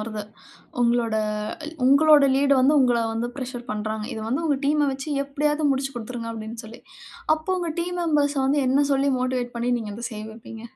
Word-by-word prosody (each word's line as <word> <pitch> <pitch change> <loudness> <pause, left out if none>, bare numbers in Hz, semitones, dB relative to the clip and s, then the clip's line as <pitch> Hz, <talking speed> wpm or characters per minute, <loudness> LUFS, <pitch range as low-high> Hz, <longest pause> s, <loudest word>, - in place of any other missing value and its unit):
வருது. 215 -1 -5 0.6
உங்களோட 235 -2 +2 0.7
உங்களோட 290 +1 +6
லீட் 280 0 +4
வந்து 280 +4 +4
உங்கள 240 -2 +3
வந்து 230 +2 -2
பிரஷர் 245 -2 -6
பண்றாங்க. 215 0 -3
இது 220 - -5
வந்து 275 +8 -1
உங்கள் 285 -3 0
டீம் 295 +1 +2
அ - - +1
வச்சு 270 +3 -6 0.2
எப்பிடியாவது 295 +1 0
முடிச்சு 270 0 -2
கொடுத்துருங்க 230 0 -5
அப்பிடின்னு 225 +1 -7
சொல்லி, 220 +1 -11 0.5
அப்போ 345 +4 -2
உங்க 345 -2 -2
டீம் 355 +1 -3
மெம்பர் 295 -3 +2
ஸ - - +1
வந்து 285 +2 +2
என்ன 280 +2 +3
சொல்லி 275 +1 +2
மோட்டிவேட் 250 -1 -2
பண்ணி 240 +1 -1
நீங்க 215 -2 -6
அத 235 +2 -5
செய்ய 215 0 -6
வைப்பீங்க? 225 0 -11
255 Hz, 190 wpm, -24 LUFS, 230-285 Hz, 0.7 s, உங்களோட